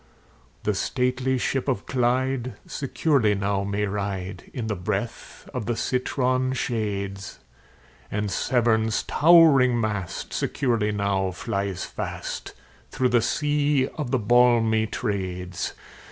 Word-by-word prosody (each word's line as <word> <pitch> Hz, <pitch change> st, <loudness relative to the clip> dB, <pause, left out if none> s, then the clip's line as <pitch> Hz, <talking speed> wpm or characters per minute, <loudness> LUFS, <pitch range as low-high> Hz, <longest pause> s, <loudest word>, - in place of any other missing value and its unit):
The 105 Hz, -, +1 dB
stately 125 Hz, +5 st, 0 dB
ship 135 Hz, +2 st, -1 dB
of 130 Hz, -, -1 dB
Clyde 130 Hz, 0 st, 0 dB
securely 135 Hz, -6 st, +1 dB
now 100 Hz, 0 st, 0 dB
may 100 Hz, +1 st, -1 dB
ride, 100 Hz, -2 st, -4 dB
In 120 Hz, -, -4 dB
the 110 Hz, -1 st, -1 dB
breath 90 Hz, -1 st, -4 dB
of 110 Hz, -, -4 dB
the 120 Hz, -, 0 dB
citron 130 Hz, 0 st, 0 dB
shades; 100 Hz, -5 st, -3 dB, 0.7 s
And 105 Hz, -1 st, -2 dB
Severn's 110 Hz, -2 st, +1 dB
towering 145 Hz, -7 st, +6 dB
mast 105 Hz, -5 st, -3 dB
securely 115 Hz, -6 st, 0 dB
now 100 Hz, -2 st, 0 dB
flies 100 Hz, +1 st, -3 dB
fast, -, -, -5 dB, 0.3 s
Through 130 Hz, -1 st, +1 dB
the 120 Hz, -1 st, +3 dB
sea 145 Hz, 0 st, +1 dB
of 150 Hz, -5 st, -5 dB
the 130 Hz, -, +2 dB
balmy 115 Hz, -1 st, +4 dB
Trades. 90 Hz, -5 st, -3 dB
115 Hz, 115 wpm, -25 LUFS, 100-130 Hz, 0.7 s, towering